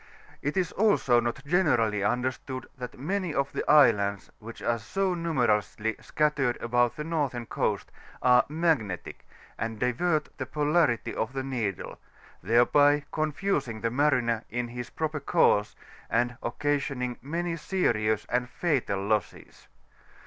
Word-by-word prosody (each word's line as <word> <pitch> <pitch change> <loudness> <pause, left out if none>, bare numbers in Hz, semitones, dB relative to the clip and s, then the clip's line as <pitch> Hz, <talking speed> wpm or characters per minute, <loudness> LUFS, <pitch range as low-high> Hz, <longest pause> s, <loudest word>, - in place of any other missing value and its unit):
It 145 +6 -2
is 180 -3 +1
also 195 - +3
not 120 +4 -3
generally 120 - +2
understood, 130 +3 -2
that 125 -2 -8
many 175 +4 -2
of 140 0 0
the - - -3
islands, 105 -9 +4
which 115 +1 -10
are 120 0 +1
so 190 - -1
numerously 120 -9 0
scattered 145 -5 0
about 120 0 +1
tibte 150 +1 -5
nortJiem 140 -8 -2
coast, - - -2 0.3
are 125 -1 +6
magnetic, 150 - -1 0.3
and 115 0 -3
divert 150 +6 0
the - - -3
polarity 150 -4 +1
of 110 +4 -3
the 135 -1 -3
needle; 115 -8 -3 0.4
thereby 145 - +4
confusingthe 145 - -1
mariner 125 -5 +2
in 120 0 -3
his 120 0 -6
proper 155 -1 -3
course, 135 -8 +2 0.3
and 120 +2 +1
occasioning 140 -1 -2
many 170 +4 -2
serious 115 - 0
and 125 0 -1
fatal 125 - -1
losses. 105 -7 -3
125 Hz, 125 wpm, -27 LUFS, 115-150 Hz, 0.4 s, are